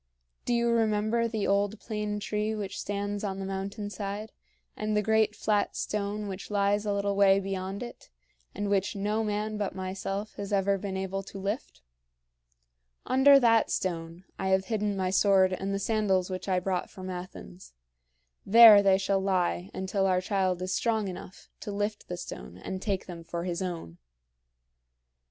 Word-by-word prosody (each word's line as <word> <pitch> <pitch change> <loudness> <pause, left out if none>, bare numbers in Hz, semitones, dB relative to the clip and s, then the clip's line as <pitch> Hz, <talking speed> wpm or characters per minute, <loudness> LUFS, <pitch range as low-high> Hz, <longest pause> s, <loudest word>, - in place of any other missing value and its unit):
Do 245 - +1
you 235 0 +2
remember 225 0 +1
the 220 -3 -2
old 200 +2 +1
plane 210 -2 -3
tree 210 +1 -2
which 205 -2 -5
stands 205 0 -3
on 195 -2 -2
the 195 - -4
mountain 195 +2 -4
side, 205 +1 -5 0.4
and 215 0 -1
the 210 - +2
great 220 0 +2
flat 210 -1 0
stone 210 0 -2
which 195 0 -7
lies 205 0 +1
a - - +1
little 200 0 0
way 195 -1 +5
beyond 195 +2 -4
it, 240 - -10 0.5
and 205 +1 -2
which 200 0 0
no 210 +2 0
man 210 0 -2
but 200 -3 -2
myself 195 +2 -4
has 200 0 -5
ever 200 0 +2
been 190 -1 -4
able 190 0 -3
to 195 - -10
lift? 195 - -4 1.2
Under 275 +2 +6
that 230 -2 +4
stone, 170 -1 -3 0.2
I 190 - -1
have 190 0 +2
hidden 210 -2 0
my 185 -1 0
sword 190 -1 +4
and 195 +1 -3
the 195 - 0
sandals 195 -3 +1
which 185 +1 -4
I 185 -1 +2
brought 185 0 -2
from 185 -2 -9
Athens. 95 - -9 0.7
There 220 0 +9
they 195 -1 +4
shall 195 0 +1
lie 175 - 0
until 195 +1 -1
our 185 -1 +3
child 185 -1 0
is 185 0 -2
strong 220 -2 0
enough 185 0 -10
to 210 - -6
lift 205 +1 -3
the 180 - -5
stone - - -8
and 190 0 -6
take 195 -3 -2
them 170 -2 -8
for 170 +1 -4
his 175 0 -3
own. 165 - -5
200 Hz, 175 wpm, -28 LUFS, 190-210 Hz, 1.2 s, There